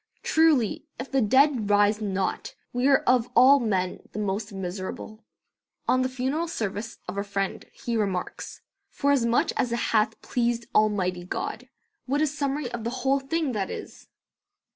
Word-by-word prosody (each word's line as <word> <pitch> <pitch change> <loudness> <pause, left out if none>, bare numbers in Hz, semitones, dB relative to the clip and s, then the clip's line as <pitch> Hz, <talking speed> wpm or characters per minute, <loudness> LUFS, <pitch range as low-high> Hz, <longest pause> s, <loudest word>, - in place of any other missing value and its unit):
Truly, 315 -6 +2
if 255 - -6
the 270 -1 +2
dead 260 -1 +3
rise 205 +1 +3
not, 195 -2 -2 0.2
we 245 +2 +1
are 275 -1 +4
of 250 -1 +3
all 265 +4 +7
men 190 -6 -1
the - - -7
most 205 +1 -2
miserable." 195 +3 -6 0.6
On 255 - +3
the 255 - 0
funeral 265 +6 -1
service 225 - -4
of 190 +2 -4
a - - -1
friend 195 -1 -3
he 235 - -4
remarks: 195 -5 -3 0.3
"'Forasmuch 265 -5 +2
as 245 - 0
it 235 - 0 0.2
hath 220 0 +2
pleased 235 -1 0
Almighty 190 -4 +2
God,' 180 - -5 0.4
what 280 +3 +1
a 310 - +3
summary 280 -2 -2
of 235 -3 -5
the 230 - -1 0.2
whole 275 +1 +3
thing 290 +1 -1
that 200 -5 -2
is!" - - -8
235 Hz, 160 wpm, -26 LUFS, 205-270 Hz, 0.6 s, all